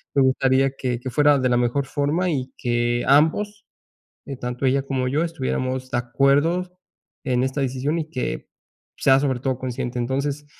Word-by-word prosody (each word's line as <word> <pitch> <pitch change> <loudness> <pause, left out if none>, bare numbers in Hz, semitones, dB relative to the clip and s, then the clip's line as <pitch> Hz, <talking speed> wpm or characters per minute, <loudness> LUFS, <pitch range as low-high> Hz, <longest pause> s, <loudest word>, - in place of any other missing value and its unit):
me 140 - +4
gustaría 130 +1 +3
que 125 -3 -2
que 130 - -5
fuera 145 0 +4
de 130 - +1
la 120 - +3
mejor 125 +3 +1
forma 150 +7 0
y 130 -3 -3
que 120 0 0
ambos, 205 +9 +2 0.8
tanto 125 +2 -3
ella 135 +1 +2
como 130 -2 -2
yo, 150 +5 +1
estuviéramos 130 -5 -3
de 120 - 0
acuerdo 145 +9 +1 0.5
en 125 -2 +1
esta 130 +2 -1
decisión 135 +5 -1
y 155 -1 -5
que 130 - -4 0.5
sea, 135 0 +4
sobre 135 -3 0
todo, 130 -2 -1
consciente. 125 -1 -4
Entonces, 140 +4 -2
135 Hz, 165 wpm, -23 LUFS, 125-145 Hz, 0.8 s, me